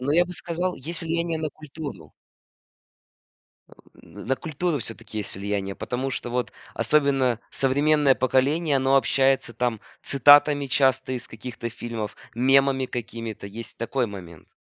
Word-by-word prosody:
Но 135 +3 0
я 175 +3 +5
бы 180 - -8
сказал, 175 +1 -2
есть 160 +5 -5
влияние 165 0 -1
на 155 -1 -2
культуру. 150 0 -9 1.6
Э, - - -25 0.3
н - - -12
на 135 +2 +1
культуру 160 +1 -2
всё-таки 115 -2 -6
есть 105 -2 -2
влияние, 100 0 -3
потому 130 +5 -3
что 125 - -4
вот 125 0 -2 0.2
особенно 130 -1 +2
современное 145 +1 +3
поколение, 140 +5 +2
оно 135 0 +3
общается 135 -1 +2
там 120 -2 -1 0.2
цитатами 145 +1 +6
часто 130 -1 +2
из 125 -1 -4
каких-то 120 +1 -6
фильмов, 115 -2 -5 0.2
мемами 135 +2 +3
какими-то. 115 -3 -6
Есть 115 +4 -8
такой 120 +2 -1
момент. 90 -6 -10
135 Hz, 140 wpm, -25 LUFS, 115-145 Hz, 1.6 s, цитатами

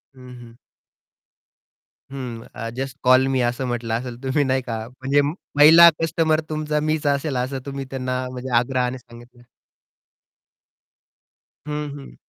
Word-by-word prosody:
हं, 125 -1 -13
हं. 115 -1 -14 1.6
हं, 125 -4 -6
अ, 115 - -5
जस्ट 135 0 -4
कॉल 130 +1 +5
मी 130 -1 +1
असं 120 +2 -1
म्हंटलं 120 -2 -3
असेल 120 +1 -4
तुम्ही 135 +2 +1
नाही 130 0 0
का? 115 -2 -5
म्हणजे 135 +3 0 0.4
पहिला 165 +3 +9
कस्टमर 160 -1 +1
तुमचा 155 -1 -1
मीच 155 -1 -1
असेल, 140 0 0
असं 130 +2 -2
तुम्ही 135 -1 -5
त्यांना 130 -1 -3
म्हणजे 130 +1 -6
आग्रहाने 125 +1 0
सांगितलं. 120 0 -16 2.3
हं, 150 0 -3
हं. 135 - -12
130 Hz, 130 wpm, -22 LUFS, 125-145 Hz, 2.3 s, पहिला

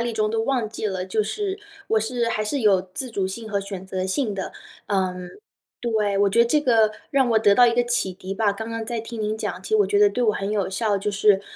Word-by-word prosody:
力 235 0 -1
中 215 -1 0
都 225 0 0
忘 245 -3 0
记 220 0 -4
了， 190 -3 -2
就 200 +4 0
是 395 - -3 0.3
我 220 - +3
是 235 +1 -1
还 215 - -1
是 270 +7 -1
有 200 -5 +4
自 260 -2 -3
主 195 -4 -1
性 220 +4 -6
和 200 -1 0
选 195 -1 -7
择 185 0 -3
性 210 +2 -1
的。 190 -1 -4 0.4
嗯， 185 -2 -1 0.5
对， 215 -4 0
我 200 0 +3
觉 220 - 0
得 235 - +7
这 300 +5 +2
个 225 -6 +4 0.2
让 270 -3 +3
我 225 - +4
得 205 -2 +4
到 245 +3 +7
一 235 - +2
个 245 - +3
启 240 -6 0
迪 185 +1 -7
吧。 210 +1 +1
刚 225 +3 -6
刚 230 0 -4
在 235 0 -3
听 225 0 -7
您 215 0 -1
讲， - - -4
其 - - -9
实 435 - +4
我 415 - +4
觉 405 - +1
得 415 0 +6
对 250 - -2
我 215 - +3
很 195 0 -3
有 205 -3 0
效。 210 +1 0
就 200 +1 -2
是 200 -1 +3
215 Hz, 285 characters per minute, -23 LUFS, 200-235 Hz, 0.5 s, 得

